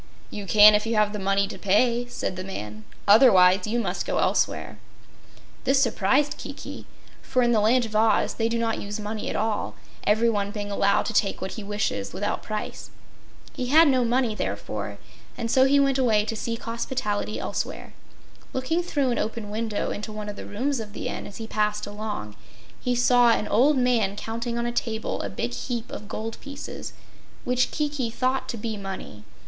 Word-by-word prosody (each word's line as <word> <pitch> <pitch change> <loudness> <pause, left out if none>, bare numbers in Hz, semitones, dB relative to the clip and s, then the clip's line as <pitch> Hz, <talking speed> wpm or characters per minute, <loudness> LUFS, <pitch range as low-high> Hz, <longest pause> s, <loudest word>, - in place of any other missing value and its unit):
"You 205 -2 -6
can 210 +2 +8
if 210 +1 +1
you 230 - 0
have 210 -1 +2
the 210 - -3
money 195 +1 +1
to - - -8
pay," 235 +5 +2
said 245 - -4
the 185 - -5
man, 105 - -7 0.2
"otherwise 195 -4 +6
you 225 +3 0
must - - -2
go - - -2
elsewhere." - - 0 0.8
This 270 0 +3
surprised 275 +4 +2
Kiki, - - -8 0.3
for 255 -1 +1
in 240 - +3
the 225 - +4
Land 235 +4 +3
of 215 -1 -7
Oz 220 0 +3
they 225 0 0
do 235 - 0
not 230 -1 -1
use 205 +1 -5
money 210 +1 -4
at - - -3
all, 215 -1 -1 0.3
everyone 210 -1 +2
being 205 -1 -5
allowed 200 0 +2
to 225 - -3
take 200 -2 +1
what 190 - -4
he 220 - -6
wishes 200 - -2
without 200 +3 -2
price. 215 -1 -5 0.6
He 250 - -3
had 315 +5 +7
no 260 -3 +3
money, 240 -1 +1
therefore, - - -4 0.4
and 230 -2 -2
so 260 0 +5
he 280 +1 +4
turned 275 -1 +3
away 220 -5 +3
to 225 - -3
seek 230 +2 -4
hospitality 230 -3 -2
elsewhere. - - -4 0.6
Looking 260 +7 0
through 285 -7 0
an 235 - 0
open 220 -2 -3
window 220 -1 -2
into 215 +1 -5
one 210 -1 -5
of 205 - -6
the - - -8
rooms 260 +6 -1
of 210 -2 -7
the - - -4
Inn, - - -5
as 200 - -10
he 225 - -5
passed 210 -1 0
along, 205 - -5 0.4
he 250 0 0
saw 245 0 +5
an 220 -2 +2
old 270 +7 +4
man 235 -6 +2
counting 235 +3 -4
on 235 - -1
a 240 - -1
table 225 -2 -2
a 100 - -4
big 120 +5 -3
heap 235 - -4
of 210 - -7
gold 220 +2 -5
pieces, 280 0 -7 0.5
which 250 0 +1
Kiki 295 -5 -2
thought 255 +2 -1
to 235 - -3
be 220 0 -4
money. 195 - -7
225 Hz, 195 wpm, -25 LUFS, 205-245 Hz, 0.8 s, can